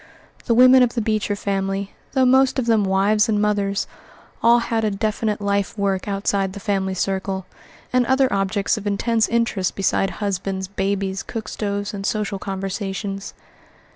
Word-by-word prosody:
The 230 Hz, -, +2 dB
women 255 Hz, +2 st, +7 dB
of 245 Hz, -1 st, +2 dB
the -, -, +1 dB
Beecher 215 Hz, -1 st, 0 dB
family, 195 Hz, 0 st, -2 dB, 0.2 s
though 265 Hz, -1 st, +3 dB
most 265 Hz, +1 st, +4 dB
of 260 Hz, -, 0 dB
them 225 Hz, -3 st, +3 dB
wives 205 Hz, +3 st, +2 dB
and 210 Hz, -1 st, +2 dB
mothers, 205 Hz, -1 st, 0 dB, 0.6 s
all 235 Hz, +1 st, +6 dB
had 230 Hz, -1 st, -1 dB
a 215 Hz, -, +2 dB
definite 210 Hz, +1 st, -1 dB
life 200 Hz, 0 st, -1 dB
work 195 Hz, -2 st, -1 dB
outside 195 Hz, -1 st, -1 dB
the 200 Hz, -, -7 dB
family 195 Hz, -2 st, -1 dB
circle, 190 Hz, 0 st, -2 dB, 0.5 s
and 250 Hz, 0 st, +4 dB
other 265 Hz, 0 st, +3 dB
objects 195 Hz, +2 st, 0 dB
of 210 Hz, -1 st, -5 dB
intense 220 Hz, +2 st, +1 dB
interest 230 Hz, -5 st, 0 dB
beside 195 Hz, 0 st, +1 dB
husbands, 195 Hz, -2 st, -2 dB
babies, 195 Hz, 0 st, -2 dB
cook 220 Hz, -2 st, -6 dB
stoves, 205 Hz, -1 st, -3 dB
and 200 Hz, -1 st, -5 dB
social 210 Hz, -2 st, -2 dB
conversations. 195 Hz, +1 st, -4 dB
200 Hz, 160 wpm, -21 LUFS, 195-220 Hz, 0.6 s, women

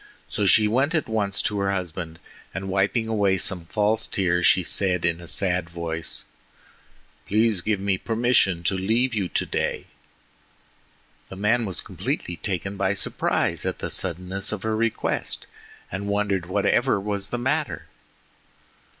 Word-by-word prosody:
So 105 Hz, -, 0 dB
she 105 Hz, +3 st, +6 dB
went 135 Hz, +9 st, +2 dB
at 155 Hz, -, +1 dB
once 105 Hz, -3 st, 0 dB
to 105 Hz, -1 st, 0 dB
her 100 Hz, 0 st, +1 dB
husband, 85 Hz, -3 st, -4 dB, 0.4 s
and 95 Hz, 0 st, -4 dB
wiping 100 Hz, +4 st, +1 dB
away 100 Hz, -4 st, +2 dB
some 90 Hz, -1 st, 0 dB
false 105 Hz, +4 st, +1 dB
tears 90 Hz, -2 st, +2 dB
she 90 Hz, -, +5 dB
said 90 Hz, 0 st, +1 dB
in 85 Hz, 0 st, 0 dB
a 85 Hz, -, -10 dB
sad 90 Hz, -1 st, +1 dB
voice: 85 Hz, -1 st, -4 dB, 1.0 s
"Please 110 Hz, -2 st, +3 dB
give 105 Hz, +1 st, 0 dB
me 95 Hz, -1 st, 0 dB
permission 115 Hz, -7 st, +2 dB
to 90 Hz, -, +2 dB
leave 115 Hz, +7 st, +1 dB
you 100 Hz, -5 st, -1 dB
today." -, -, -1 dB, 1.4 s
The -, -, -8 dB
man 110 Hz, +4 st, +2 dB
was 95 Hz, -, -2 dB
completely 85 Hz, -, -3 dB
taken 95 Hz, 0 st, -3 dB
by 100 Hz, 0 st, +1 dB
surprise -, -, 0 dB
at -, -, -2 dB
the -, -, -5 dB
suddenness 95 Hz, +2 st, 0 dB
of 105 Hz, -3 st, -4 dB
her 110 Hz, 0 st, 0 dB
request, 115 Hz, 0 st, -1 dB, 0.5 s
and 100 Hz, +2 st, -4 dB
wondered 100 Hz, -3 st, 0 dB
whatever 105 Hz, +4 st, +2 dB
was 100 Hz, 0 st, -3 dB
the 120 Hz, -, -2 dB
matter. 145 Hz, +5 st, -1 dB
100 Hz, 150 wpm, -24 LUFS, 90-110 Hz, 1.4 s, she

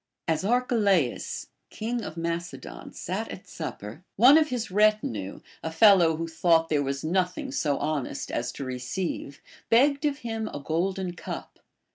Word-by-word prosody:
As 160 Hz, -1 st, +1 dB
Arche 245 Hz, +5 st, +1 dB
laus, 195 Hz, -, +1 dB, 0.2 s
king 230 Hz, +2 st, -3 dB
of 155 Hz, -, -7 dB
Macedon, 170 Hz, -, -5 dB
sat -, -, -4 dB
at -, -, -9 dB
supper, 105 Hz, -, -7 dB
one 250 Hz, +7 st, +8 dB
of 310 Hz, -1 st, +4 dB
his 230 Hz, -5 st, -3 dB
retinue, 205 Hz, -, +1 dB, 0.2 s
a 160 Hz, -, -4 dB
fellow 175 Hz, -2 st, +6 dB
who 165 Hz, +1 st, -3 dB
thought 165 Hz, 0 st, +3 dB
there 150 Hz, -2 st, +2 dB
was 140 Hz, 0 st, -2 dB
nothing 185 Hz, -, -1 dB
so 150 Hz, -, 0 dB
honest 145 Hz, -3 st, -3 dB
as 120 Hz, -, -2 dB
to 140 Hz, -, -6 dB
re 130 Hz, -1 st, -4 dB
ceive, 140 Hz, +1 st, -4 dB, 0.3 s
begged 275 Hz, +5 st, +4 dB
of 285 Hz, -2 st, +1 dB
him 225 Hz, -1 st, -2 dB
a -, -, -6 dB
golden 180 Hz, +4 st, -1 dB
cup. -, -, -7 dB
175 Hz, 160 wpm, -27 LUFS, 150-220 Hz, 0.3 s, one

